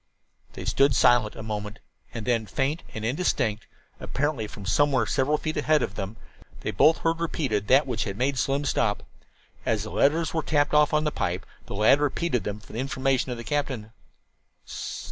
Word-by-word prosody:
They - - -7
stood 135 -1 +3
silent 120 -3 +4
a 110 - -7
moment, 105 0 -5 0.3
and 115 -3 -6
then, 115 -3 +1
faint 135 - -1
and 110 0 -4
indistinct, 115 - 0 0.3
apparently 140 -6 -2
from 100 -1 -10
somewhere 130 +2 +2
several 145 +5 +1
feet 155 +1 -3
ahead 155 -4 +3
of - - -3
them, 100 +2 -5 0.4
they - - -2
both 155 +11 +5
heard 165 0 0
repeated 130 -11 -1
that 135 +3 +5
which 125 -4 -2
had 100 -2 -4
made 130 +2 0
Slim 140 +3 0
stop. 105 -6 0 0.6
As - - 0
the - - -7
letters 160 +4 +2
were 160 - +1
tapped 145 -1 +1
off 150 0 +5
upon 155 -2 +1
the 150 - 0
pipe 90 -8 -2 0.2
the - - -6
lad 110 +7 +5
repeated 145 -2 0
them 105 0 -3
for 105 - -15
the 115 - -4
information 130 0 0
of 120 - -4
the 115 - -7
captain. 130 -6 -2
130 Hz, 185 wpm, -26 LUFS, 110-145 Hz, 0.6 s, both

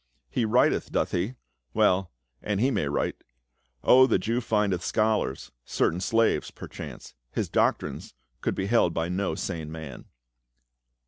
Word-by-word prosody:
He 115 - +1
writcth, 120 +4 +2
doth - - 0
he? 95 +8 -1 0.4
Well, 95 -1 +3 0.3
and 105 -2 -1
he 130 +5 +3
may 75 - 0
write. 70 - -2 0.6
O, 130 +1 +7
the - - +3
Jew 115 +6 -1
findeth 105 -6 +1
scholars! 110 -10 0
Certain 85 +7 0
slaves, 115 +4 +2
perchance. - - -9 0.2
His - - -2
doctrines - - 0 0.3
could - - -1
be 95 - -2
held 100 -6 +3
by 80 +1 -1
no 95 +2 -1
sane 80 -4 -4
man." 80 -5 -8
95 Hz, 140 wpm, -27 LUFS, 85-115 Hz, 0.6 s, O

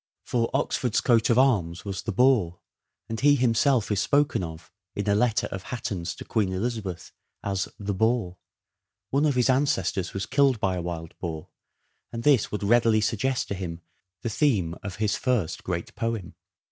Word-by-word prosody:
For 115 -2 0
Oxford's 130 -4 0
coat 115 -2 +3
of 115 - +4
arms 100 -11 +2
was 95 -2 -4
the 110 - -3
boar, 110 -6 +3 0.5
and 115 0 -4
he 145 +1 +5
himself 125 -2 +2
is 100 -1 +1
spoken 145 -3 +2
of, 80 +1 -8 0.2
in 100 - -3
a 100 - +4
letter 110 +1 +2
of 95 - -4
Hatton's 90 -8 -4
to - - -9
Queen 105 -5 0
Elizabeth 100 -3 -4 0.3
as 95 -2 -1
" - - -43
the 100 - +1
boar." 110 -3 0 0.7
One 140 +3 +2
of 140 - +1
his 125 -1 +3
ancestors 115 -9 +1
was 95 - -2
killed 135 -3 +3
by 95 -2 0
a 90 - -2
wild 85 -1 -5
boar, 80 -3 -5 0.6
and 115 0 -5
this 140 -6 +3
would 105 - -3
readily 115 +1 +4
suggest 115 +5 0
to - - -1
him 90 -3 -5 0.4
the 115 - -1
theme 105 - +1
of 100 -3 -6
his 105 0 0
first 120 - -1
great 85 -2 -4
poem. 115 -6 -3
110 Hz, 180 wpm, -26 LUFS, 95-125 Hz, 0.7 s, he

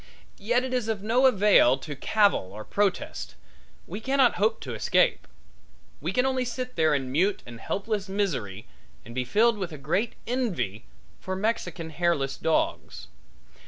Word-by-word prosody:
Yet 240 +5 +1
it 260 0 -4
is 250 -3 0
of 215 -3 -2
no 245 +5 +4
avail 200 - +5
to 145 +2 -7
cavil 200 - +2
or 110 +1 -8
protest; 200 -2 -2 0.5
we 195 +5 -6
cannot 265 +1 +2
hope 220 +1 +2
to - - -6
escape; - - +2 0.7
we - - -2
can 250 +1 +1
only 260 -1 +1
sit 250 +1 -5
there 160 -2 +3
in 130 -2 -3
mute 185 +9 +1
and 120 -1 -10
helpless 200 - -3
misery 130 - -2 0.4
and 115 - -10
be 130 +1 -1
filled 220 - +2
with 185 -3 -3
a 155 - -7
great 175 +11 -1
envy 170 - -2 0.3
for 185 - -4
Mexican 180 -6 -2
hairless 155 -5 0
dogs. 160 - -1
195 Hz, 160 wpm, -26 LUFS, 145-230 Hz, 0.7 s, avail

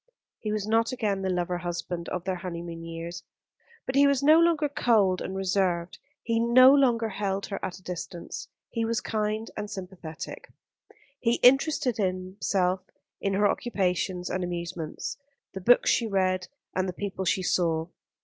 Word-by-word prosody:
He 215 - -3
was 210 -1 -2
not 225 +2 +2
again 210 -6 -1
the 190 - -1
lover 180 -1 -1
husband 175 0 -4
of 180 - -3
their 185 0 -2
honeymoon 170 -2 -6
years; 165 +1 -6 0.6
but 260 - -3
he 280 +1 +6
was 280 -1 +2
no 310 +3 +7
longer 335 -3 +3
cold 215 -9 +2
and 190 - -4
reserved, 185 -2 0 0.2
he 230 -1 +1
no 255 +3 +7
longer 240 -5 +3
held 195 -1 -2
her 195 - -6
at 185 -1 -3
a 185 - -18
distance. 175 -1 -6 0.2
He 230 -1 -1
was 225 0 0
kind 215 0 -2
and 210 -1 -4
sympathetic. 180 -5 -8 0.7
He 235 0 +2
interested 270 -1 +4
himself 185 -1 0 0.4
in 195 -1 0
her 205 +1 +4
occupations 185 -5 -1
and 185 - -1
amusements, 170 -2 -4 0.4
the 190 - -6
books 245 +7 +5
she 230 - +2
read 185 -2 +1 0.3
and 185 0 0
the - - -4
people 190 0 -4
she 185 0 +1
saw. 165 -3 +1
190 Hz, 160 wpm, -27 LUFS, 180-225 Hz, 0.7 s, no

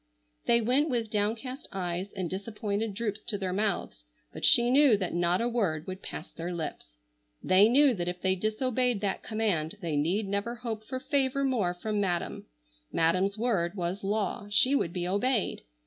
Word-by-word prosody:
They 235 0 +4
went 260 +7 +2
with 230 -4 -1
downcast 225 +6 -2
eyes 185 0 -3
and 185 -3 -3
disappointed 205 +2 -3
droops 215 -1 -2
to 220 -4 -1
their 190 -2 -3
mouths, 195 - -2 0.3
but - - -9
she 240 +1 +6
knew 270 -5 +6
that 185 -3 -3
not 175 +2 +2
a 235 - +1
word 190 -10 0
would 185 0 -6
pass 160 - -7
their 170 +1 -5
lips. 170 -3 -5 0.6
They 195 +4 +5
knew 275 +2 +5
that 175 -5 -3
if 180 0 -3
they 190 0 +2
disobeyed 235 +3 0
that 200 -2 -1
command 210 -6 -1
they 165 -6 -2
need 180 +8 0
never 200 +4 -2
hope 230 -3 -5
for 255 +3 -5
favor 275 0 0
more 220 -10 +1
from 210 +3 -2
madam. 175 -3 -2 0.4
Madam's 185 +5 +2
word 205 -6 0
was 180 +1 -3
law. 205 0 -1
She 250 +6 +4
would 175 - +1
be 175 0 -3
obeyed. 210 +4 0
205 Hz, 180 wpm, -29 LUFS, 180-235 Hz, 0.6 s, she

